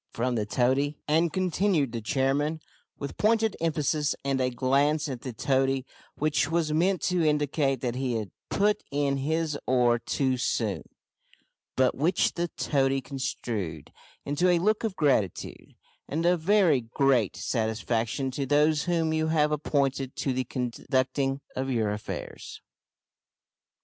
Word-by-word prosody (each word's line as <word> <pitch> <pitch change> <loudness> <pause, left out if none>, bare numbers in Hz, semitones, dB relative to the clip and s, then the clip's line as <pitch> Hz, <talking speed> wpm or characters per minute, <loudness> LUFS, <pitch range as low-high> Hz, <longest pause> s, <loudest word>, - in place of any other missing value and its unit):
from 125 +2 -1
the 105 -3 -1
toady. 135 +5 +1
"And," 160 +2 +2
continued 185 - +1
the 115 -1 -4
chairman, 140 +7 0 0.4
with 140 -1 -6
pointed 220 0 +2
emphasis, 150 -2 0
and 135 -1 +1
a 125 - +2
glance 140 +5 +1
at 130 -4 -5
the 130 - -5
toady, 135 +2 0 0.3
which 150 -1 +1
was 165 -2 0
meant 180 +2 +1
to 180 -2 +1
indicate 145 -3 +1
that 120 -2 -1
he 130 -1 -2
had 110 -4 -3 0.2
put 210 +1 +2
in 140 -1 0
his 155 +2 -1
oar 120 -2 +3
too 130 +2 0
soon, 110 -4 -1 0.9
but 130 -1 +3
which 160 +7 +1
the 175 0 -1
toady 135 -2 +1
construed 115 - -4 0.3
into 145 +6 +1
a 175 - +4
look 210 +6 +1
of 220 -4 -2
gratitude 130 - -1 0.3
"and 160 +4 -2
of 175 -1 +3
very 180 -7 +4
great 120 -2 +1
satisfaction 115 +3 -1
to 135 +1 -3
those 150 +2 +3
whom 165 -3 +1
you 160 0 +1
have 150 -1 +2
appointed 135 -3 -1
to 135 - -1
the 130 0 -1
conducting 130 +2 -1
of 130 +1 -2
your 110 -5 +1
affairs." 105 +1 -6
140 Hz, 145 wpm, -27 LUFS, 130-155 Hz, 0.9 s, a